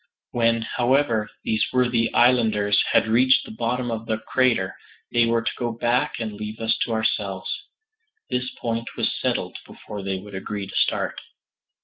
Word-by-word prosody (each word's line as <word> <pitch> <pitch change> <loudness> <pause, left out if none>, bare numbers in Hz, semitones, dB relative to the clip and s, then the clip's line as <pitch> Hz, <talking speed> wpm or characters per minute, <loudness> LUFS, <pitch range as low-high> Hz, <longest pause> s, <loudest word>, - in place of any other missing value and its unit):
When, 115 -1 +2
however, 120 -2 +1
these 110 -2 +1
worthy 120 -2 +2
islanders 110 -5 +4
had - - +4
reached 125 +4 +4
the - - -9
bottom 120 +2 -1
of 115 0 -4
the 110 - 0
crater, 115 -4 +1 0.4
they 120 -1 +4
were 115 0 +2
to 115 - 0
go 120 -2 -1
back 120 +2 +1
and 110 -2 -3
leave 105 +1 -6
us 115 0 +1
to - - 0
ourselves. 100 -4 -1 0.7
This 125 0 -1
point 115 0 -2
was - - 0
settled - - -1
before 105 -1 -9
they 95 0 -2
would 100 +2 -10
agree 100 +1 -4
to 95 - -10
start. - - 0
115 Hz, 160 wpm, -24 LUFS, 105-120 Hz, 0.7 s, islanders